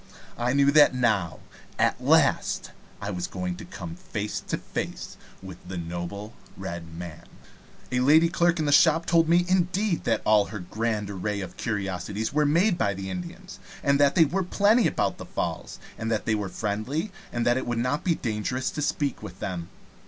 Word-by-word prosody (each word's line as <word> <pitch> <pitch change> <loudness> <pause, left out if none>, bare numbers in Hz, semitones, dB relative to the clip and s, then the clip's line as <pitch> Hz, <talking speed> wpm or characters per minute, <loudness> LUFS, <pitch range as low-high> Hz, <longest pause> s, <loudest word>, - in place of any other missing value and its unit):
I 120 +1 0
knew 140 0 +4
that 150 -3 +6
now, 110 -9 +1 0.4
at - - +1
last, - - +3 0.3
I 100 - -4
was 90 -2 -3
going 90 -1 -4
to - - -9
come 85 -3 -7
face 105 +4 -4
to - - -3
face - - -5 0.3
with 95 -2 -9
the 95 0 -5
noble 90 +6 -5 0.2
Red 85 -1 -6
Man. 85 -3 -8 0.7
A 125 - +1
lady 155 +6 +6
clerk 170 0 +2
in 155 -2 0
a - - +2
shop 160 +3 +5
told 165 -1 +3
me, 175 +1 +4
indeed, 185 +1 +1
that 115 -2 +1
all 105 -1 +5
her 105 - -7
grand 105 +2 -2
array 100 +2 -2
of 95 - -7
curiosities 105 +1 -3
were 150 0 +3
made 170 +5 +3
by 100 -2 +1
the 95 0 -5
Indians, 185 +2 -7 0.2
and 140 0 +3
that 140 -1 +4
they 165 - +7
were 185 +6 -1
plenty 205 +5 +3
about - - -1
the - - -7
Falls, - - -4 0.2
and 110 - -2
that 110 -2 -1
they 110 - +2
were 105 -3 -1
friendly, 115 - -2 0.2
and 120 0 -1
it 120 +1 +1
would 120 -1 -1
not 125 +6 0
be 170 -3 +2
dangerous 120 +3 -2
to 150 - -4
speak 145 -2 -1
to 105 - -7
them. 90 -1 -5
115 Hz, 190 wpm, -26 LUFS, 100-160 Hz, 0.7 s, they